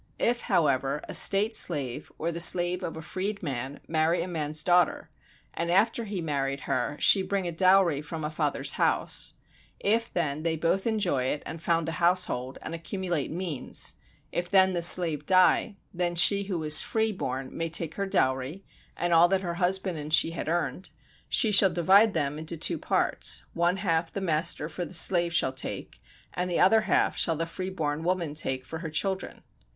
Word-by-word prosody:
If, 240 Hz, 0 st, 0 dB
however, 145 Hz, -, -1 dB
a -, -, -7 dB
state 210 Hz, +3 st, +5 dB
slave 145 Hz, -, -1 dB
or 165 Hz, +2 st, -3 dB
the 170 Hz, -, -5 dB
slave 175 Hz, +1 st, +4 dB
of 165 Hz, -, -6 dB
a 160 Hz, -, -9 dB
freed 200 Hz, +5 st, -5 dB
man 135 Hz, -2 st, -5 dB
marry 165 Hz, +2 st, 0 dB
a -, -, -7 dB
man's 155 Hz, -3 st, -4 dB
daughter, 175 Hz, 0 st, +1 dB, 0.4 s
and 170 Hz, 0 st, -4 dB
after 225 Hz, +6 st, +1 dB
he 200 Hz, -3 st, -5 dB
married 140 Hz, -3 st, -3 dB
her 130 Hz, +4 st, -3 dB
she 195 Hz, -, +5 dB
bring 190 Hz, -1 st, -3 dB
a -, -, -3 dB
dowry 185 Hz, -3 st, +2 dB
from 160 Hz, +1 st, -8 dB
a 150 Hz, -, -4 dB
father's 150 Hz, -2 st, 0 dB
house, -, -, 0 dB, 0.4 s
if 225 Hz, +3 st, -1 dB
then 155 Hz, -4 st, -2 dB
they 165 Hz, 0 st, -2 dB
both 170 Hz, +6 st, -1 dB
enjoy 190 Hz, -, -1 dB
it 145 Hz, +3 st, -3 dB
and 165 Hz, -, -8 dB
found 165 Hz, -1 st, -1 dB
a -, -, -2 dB
household, 170 Hz, -8 st, 0 dB
and -, -, -7 dB
accumulate 175 Hz, -2 st, -4 dB
means, 170 Hz, -4 st, -3 dB, 0.4 s
if 175 Hz, 0 st, -4 dB
then 190 Hz, -1 st, +3 dB
the 175 Hz, -, -2 dB
slave 165 Hz, -4 st, +7 dB
die, 185 Hz, +3 st, +3 dB, 0.2 s
then 175 Hz, -1 st, -2 dB
she 200 Hz, +3 st, +6 dB
who 190 Hz, -3 st, -4 dB
was 155 Hz, -1 st, +6 dB
free 220 Hz, 0 st, -1 dB
born 130 Hz, -8 st, -6 dB
may 165 Hz, 0 st, -3 dB
take 165 Hz, -1 st, 0 dB
her 200 Hz, 0 st, -4 dB
dowry, 130 Hz, +3 st, -1 dB, 0.3 s
and 175 Hz, 0 st, -1 dB
all 165 Hz, +1 st, +5 dB
that 190 Hz, +1 st, -1 dB
her 175 Hz, -2 st, -4 dB
husband 185 Hz, -2 st, -1 dB
and 150 Hz, +1 st, -8 dB
she 165 Hz, -, +2 dB
had 165 Hz, -2 st, -6 dB
earned; 175 Hz, +2 st, -3 dB, 0.4 s
she 220 Hz, -, +3 dB
shall 195 Hz, -1 st, +6 dB
divide 190 Hz, +5 st, +3 dB
them 145 Hz, +1 st, -2 dB
into 160 Hz, +2 st, -5 dB
two -, -, +1 dB
parts, -, -, -1 dB
one 175 Hz, +2 st, 0 dB
half 165 Hz, -4 st, -1 dB
the -, -, -5 dB
master 165 Hz, -4 st, -1 dB
for 170 Hz, +3 st, -6 dB
the 175 Hz, -, -7 dB
slave 170 Hz, 0 st, +3 dB
shall 170 Hz, -6 st, 0 dB
take, 130 Hz, -, -7 dB, 0.3 s
and 180 Hz, 0 st, -3 dB
the 175 Hz, -, -1 dB
other 220 Hz, +4 st, +4 dB
half -, -, 0 dB
shall 165 Hz, -, 0 dB
the 165 Hz, +2 st, -3 dB
free 185 Hz, +3 st, -6 dB
born 155 Hz, -4 st, -4 dB
woman 175 Hz, -3 st, -2 dB
take 130 Hz, -4 st, -2 dB
for 160 Hz, +4 st, -8 dB
her 165 Hz, -1 st, -6 dB
children. 190 Hz, +5 st, -4 dB
170 Hz, 190 wpm, -26 LUFS, 155-190 Hz, 0.4 s, slave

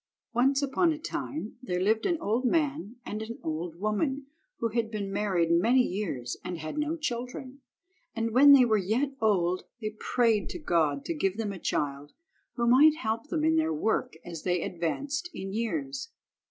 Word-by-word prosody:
ONCE 270 Hz, +4 st, +3 dB
upon 305 Hz, +5 st, +2 dB
a 310 Hz, -, -2 dB
time 300 Hz, -6 st, -5 dB
there 180 Hz, -8 st, -2 dB
lived 220 Hz, +4 st, +2 dB
an 345 Hz, -3 st, +1 dB
old 225 Hz, +5 st, 0 dB
man 285 Hz, -4 st, 0 dB
and 215 Hz, -, -4 dB
an 230 Hz, +2 st, -6 dB
old 160 Hz, +1 st, -3 dB
woman, 265 Hz, +7 st, -1 dB, 0.3 s
who 230 Hz, -, -1 dB
had 225 Hz, 0 st, -1 dB
been 200 Hz, -3 st, -4 dB
married 190 Hz, -5 st, +1 dB
many 230 Hz, +10 st, +4 dB
years 175 Hz, -, -3 dB
and 180 Hz, -, -4 dB
had 155 Hz, -, -6 dB
no 300 Hz, +2 st, -1 dB
children, 255 Hz, -1 st, -5 dB, 0.5 s
and 230 Hz, 0 st, -1 dB
when 275 Hz, +5 st, +8 dB
they 270 Hz, -3 st, +8 dB
were 220 Hz, -2 st, +3 dB
yet 225 Hz, +9 st, 0 dB
old 185 Hz, -4 st, +2 dB
they 215 Hz, -2 st, -3 dB
prayed 225 Hz, 0 st, +1 dB
to -, -, -5 dB
God 160 Hz, -, +1 dB
to -, -, -1 dB
give 190 Hz, +5 st, -1 dB
them 215 Hz, -3 st, -2 dB
a 190 Hz, -, -8 dB
child 145 Hz, -2 st, -2 dB, 0.4 s
who 235 Hz, -, 0 dB
might 285 Hz, +6 st, +6 dB
help 225 Hz, -2 st, -3 dB
them 315 Hz, -2 st, -1 dB
in 320 Hz, +1 st, +3 dB
their 320 Hz, 0 st, +2 dB
work 220 Hz, -, 0 dB
as 170 Hz, -3 st, -7 dB
they 180 Hz, -2 st, 0 dB
advanced 275 Hz, -, -3 dB
in 195 Hz, 0 st, -5 dB
years. 270 Hz, -, -3 dB
225 Hz, 180 wpm, -28 LUFS, 185-275 Hz, 0.5 s, when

